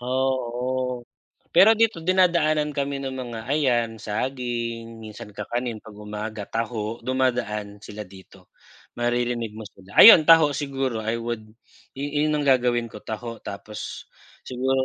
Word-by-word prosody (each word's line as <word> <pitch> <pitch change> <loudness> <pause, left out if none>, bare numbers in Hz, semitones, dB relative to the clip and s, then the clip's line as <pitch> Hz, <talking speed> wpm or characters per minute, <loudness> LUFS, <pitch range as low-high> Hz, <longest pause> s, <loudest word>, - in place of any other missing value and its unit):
Oo, 125 0 -1 0.5
pero 220 +4 +7
dito 220 -7 +1
dinadaanan 170 -5 +3
kami 140 0 -2
ng 135 -1 -4
mga 120 -3 -6
ayan, 125 -6 +2
saging, 115 0 -4
minsan, 105 -1 -10
kakanin 115 +2 -4
'pag 105 -2 -14
umaga, 105 0 -6
taho, 115 0 -3
dumadaan 115 -5 -1
sila 105 0 -8
dito, 95 0 -17 0.4
maririnig 120 -2 -1
mo 110 - -7
sila, 95 -1 -15
ayon, 170 -9 +10
taho, 160 -3 +7
siguro 135 -4 -2
I 110 +1 -1
would 115 -2 -5 0.5
yu 145 +1 -4 0.2
yun 150 - +1
ang 145 - -1
gagawin 120 -3 +2
ko 105 - -9
taho 115 +2 -6
tapos 100 +2 -7 0.4
siguro, 130 +1 0
120 Hz, 135 wpm, -24 LUFS, 110-135 Hz, 0.5 s, ayon